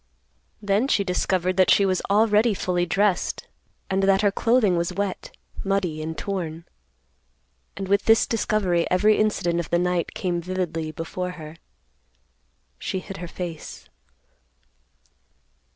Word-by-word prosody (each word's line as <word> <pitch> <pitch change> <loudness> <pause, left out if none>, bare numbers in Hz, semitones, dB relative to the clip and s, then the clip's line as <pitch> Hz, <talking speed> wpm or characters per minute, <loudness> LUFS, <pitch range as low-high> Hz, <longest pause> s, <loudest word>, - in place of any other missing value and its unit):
Then 205 +5 +2
she 205 - +2
discovered 185 0 0
that 185 - +4
she 200 - +5
was 185 -1 +1
already 210 +1 +3
fully 180 -1 -1
dressed, 195 +1 0 0.4
and 190 0 0
that 195 0 +3
her 205 - +4
clothing 225 -3 +2
was 170 +1 -1
wet, 195 0 -3 0.3
muddy 195 -6 -1
and 160 0 -5
torn. 170 -4 -4 1.1
And 195 -1 -4
with 200 +1 +2
this 225 0 +5
discovery 200 -6 0
every 210 +4 +3
incident 175 -5 +1
of 170 - -4
the 170 - +2
night 180 -1 -1
came 175 -2 -1
vividly 170 -3 -3
before 180 +3 -5
her. 155 -1 -10 1.2
She - - -3
hid 195 +1 -7
her 175 -1 -6
face. 170 -2 -7
185 Hz, 135 wpm, -24 LUFS, 175-200 Hz, 1.2 s, she